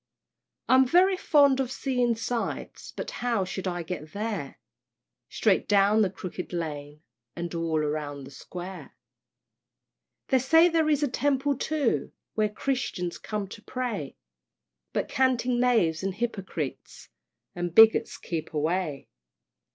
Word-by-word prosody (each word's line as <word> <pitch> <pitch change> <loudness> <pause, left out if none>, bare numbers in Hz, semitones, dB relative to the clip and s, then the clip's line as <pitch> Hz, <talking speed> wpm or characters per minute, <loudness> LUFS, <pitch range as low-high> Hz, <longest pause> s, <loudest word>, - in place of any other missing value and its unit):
I'm 260 0 +5
very 365 +7 +5
fond 285 -6 +4
of 260 -2 -1
seeing 250 -3 0
sights, 230 +1 -4
But - - -6
how 235 -6 +1
shall 185 +1 -3
I 175 -1 -4
get 155 -2 -7
there? 205 -9 -4 0.7
"Straight 205 -4 +1
down 205 +1 +4
the 200 - +3
Crooked 185 -1 -7
Lane, 150 -3 -5 0.3
And 170 0 -5
all 165 -2 0
round 145 -2 -3
the 135 - -12
Square." 180 +6 -9 1.3
They 265 - +4
say 325 +7 +5
there 320 -2 +2
is 295 -1 +2
a - - +3
Temple 280 +2 +1
too, 285 -2 -1 0.2
Where 215 -1 +1
Christians 210 -7 -3
come 210 -2 -4
to 205 - -10
pray; 250 +2 -4 0.7
But - - -1
canting 255 -2 +1
knaves 225 -11 +2
and 190 -1 -2
hypocrites, 195 - -5 0.4
And 175 -1 -4
bigots 225 0 +6
keep 160 -2 -5
away. 155 -1 -1
210 Hz, 130 wpm, -27 LUFS, 170-255 Hz, 1.3 s, bigots